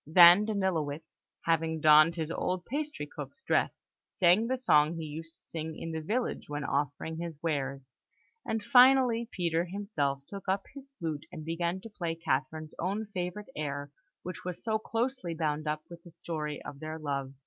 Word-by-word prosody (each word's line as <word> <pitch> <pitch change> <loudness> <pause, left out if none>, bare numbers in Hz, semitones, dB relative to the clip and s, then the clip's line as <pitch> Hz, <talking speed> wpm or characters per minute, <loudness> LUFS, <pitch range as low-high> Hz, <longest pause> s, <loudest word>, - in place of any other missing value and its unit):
Then 175 +5 +8
Danilowitz, 165 -7 -2 0.2
having 165 -1 +1
donned 155 +2 +7
his 160 -1 -3
old 180 +1 -2
pastry 300 +3 -3
cook's 470 - -9
dress, - - 0 0.2
sang 185 +5 +4
the 260 +1 0
song 155 -10 +4
he 165 -1 -4
used 160 +2 -7
to - - -14
sing 160 -1 -5
in 165 - -5
the 160 0 -3
village 225 +5 -2
when 145 0 -3
offering 145 +3 -2
his 170 -3 -5
wares; 135 -4 -2 0.6
and 220 -1 -2
finally, 250 -2 +6
Peter 170 -2 0
himself 165 -8 -2
took 195 +2 -7
up 195 +1 +1
his 275 -1 -11
flute, 155 - -4
and 155 -4 -7
began 170 +3 -1
to 225 - -9
play 170 -5 -3
Catherine's 155 0 -2
own 200 +4 -2
favourite 180 +3 -4
air, 145 -1 -3 0.3
which 180 -1 -6
was 180 -1 -5
so 220 -1 +1
closely 230 -5 -2
bound 155 -1 -1
up 150 0 -1
with 170 -1 -11
the 175 - -14
story 160 -3 -4
of 140 - -8
their 155 +1 -5
love. 140 -3 -3
165 Hz, 175 wpm, -30 LUFS, 155-200 Hz, 0.6 s, Then